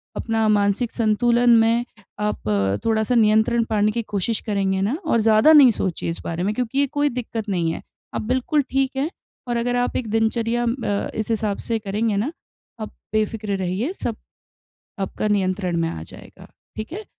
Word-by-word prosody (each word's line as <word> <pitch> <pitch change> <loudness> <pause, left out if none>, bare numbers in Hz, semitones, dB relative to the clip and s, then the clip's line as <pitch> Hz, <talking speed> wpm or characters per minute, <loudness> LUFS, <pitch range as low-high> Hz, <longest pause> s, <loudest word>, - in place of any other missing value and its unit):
अपना 225 -1 0
मानसिक 205 +3 +2
संतुलन 240 +2 +2
में 230 +2 +2 0.3
आप 210 - -2 0.4
थोड़ा-सा 220 +2 +1
नियंत्रण 220 +1 +3
पाने 215 -1 +2
की 235 - -2
कोशिश 210 +1 -2
करेंगे 195 -2 0
ना, 230 +10 0
और 235 -7 +2
ज़्यादा 220 +7 +5
नहीं 275 -6 +8
सोचिए 185 -5 -3
इस 165 - -4
बारे 170 +2 -3
में 205 - 0
क्योंकि 250 +2 -1
ये 280 - +3
कोई 290 +2 0
दिक्कत 230 -3 -5
नहीं 170 -4 0
है। - - -5 0.3
आप - - -1
बिल्कुल 260 +6 +1
ठीक 270 0 +1
हैं, 290 +4 0 0.4
और 240 -1 0
अगर 245 +1 0
आप 245 0 0
एक 235 - -3
दिनचर्या 230 +1 +1
अ, 230 -4 -1
इस 220 0 -3
हिसाब 215 -2 -1
से 230 -1 0
करेंगे 210 +1 -1
ना, 240 +10 -1 0.5
आप 215 - -5 0.2
बेफ़िक्र 215 -1 -1
रहिए 190 - -2
सब 230 - -1 0.8
आपका 195 +2 -2
नियंत्रण 185 -3 0
में 165 0 0
आ 80 - -6
जाएगा, - - -13 0.3
ठीक 215 +4 -6
है। 420 +1 -6
220 Hz, 180 wpm, -22 LUFS, 205-240 Hz, 0.8 s, नहीं